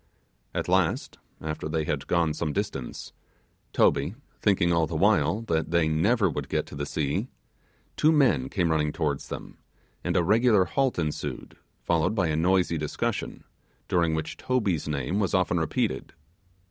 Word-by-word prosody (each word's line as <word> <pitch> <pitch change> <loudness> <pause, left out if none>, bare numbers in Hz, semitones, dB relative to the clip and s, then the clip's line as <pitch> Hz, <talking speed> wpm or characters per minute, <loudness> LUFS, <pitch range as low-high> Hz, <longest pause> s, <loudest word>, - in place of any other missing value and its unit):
At - - -1
last, - - +1 0.2
after 80 0 -4
they 80 0 0
had 70 -2 -3
gone 85 -3 +2
some 75 -1 -2
distance, 100 -11 -4 0.6
Toby, 80 +9 +2 0.3
thinking 90 -4 +3
all 85 -1 +2
the 80 - -5
while 105 +4 +3
that 80 -7 -1
they 85 -1 +2
never 100 +8 +2
would 80 - -4
get - - 0
to - - -10
the 70 0 -3
sea, 75 -2 -1 0.7
two 155 - +4
men 130 - +3
came 85 -4 0
running 75 -1 +1
towards 70 -3 -2
them, - - -8 0.4
and - - 0
a 85 - +3
regular 110 0 +4
halt 135 +6 0
ensued, 75 -3 -4 0.3
followed 85 +5 +1
by 90 -6 +1
a 75 - 0
noisy 90 0 +2
discussion, 75 -1 -3 0.4
during 85 -3 +2
which 80 - -4
Toby's 105 - 0
name 75 +6 -1
was 100 -1 +1
often 90 -1 +2
repeated. 80 - -1
85 Hz, 160 wpm, -27 LUFS, 75-100 Hz, 0.7 s, two